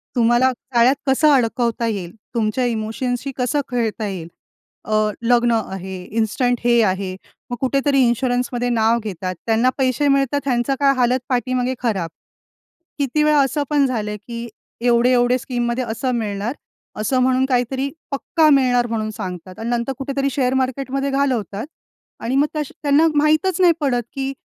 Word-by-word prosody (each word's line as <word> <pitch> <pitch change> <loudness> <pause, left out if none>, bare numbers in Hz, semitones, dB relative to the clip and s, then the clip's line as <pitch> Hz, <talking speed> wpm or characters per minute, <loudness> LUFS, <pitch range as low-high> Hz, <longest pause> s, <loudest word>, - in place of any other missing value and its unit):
तुम्हाला 240 +2 +4
जाळ्यात 250 +1 +2
कसं 295 +3 +4
अडकवता 235 -2 +1
येईल? 190 -6 -3 0.2
तुमच्या 230 +2 0
इमोशनशी 245 +4 -2
कसं 260 +4 0
खेळता 225 -3 -1
येईल? 185 -5 -5 0.6
अ, 215 - -3 0.3
लग्न 240 0 +3 0.2
आहे, 190 -1 -6
इन्स्टंट 230 +3 0
हे 235 -1 +5
आहे. 190 -1 -1 0.3
मग 245 - -2
कुठेतरी 275 +1 +2
इन्शुरन्समध्ये 245 0 0
नाव 230 0 +2
घेतात. 185 -3 -4
त्यांना 230 +2 +3
पैसे 265 +1 +1
मिळतात. 275 0 +2
ह्यांचा 250 0 +1
काय 275 -1 +4
हालत 250 +1 +2
पाठीमागे 255 +1 0
खराब. 195 -8 -1 0.9
किती 285 +2 +1
वेळा 300 -1 +4
असं 290 +2 -1
पण 290 -2 +3
झालं, 215 -4 -2
की 235 0 -5 0.4
एवढे-एवढे 245 +1 +4
स्कीममध्ये 240 0 -2
असं 235 +2 -2
मिळणार. 210 0 -2 0.5
असं 255 +5 +1
म्हणून 260 0 +2
काहीतरी, 265 +1 0 0.2
पक्का 310 +3 +2
मिळणार 250 -3 +3
म्हणून 220 -1 -2
सांगतात 185 -2 -7
आणि 225 +1 -3
नंतर 240 +2 -1
कुठेतरी 275 0 -1
शेअर 255 -2 0
मार्केटमध्ये 270 +1 -1
घालवतात 250 -7 -1 0.6
आणि 245 +3 -1
मग 285 +2 +3
तश्या 300 -2 -3
त्यांना 295 +3 +4
माहीतच 310 +5 +2
नाही 345 -2 +6
पडत, 245 -4 +1
की 270 0 -3
245 Hz, 145 wpm, -20 LUFS, 230-270 Hz, 0.9 s, नाही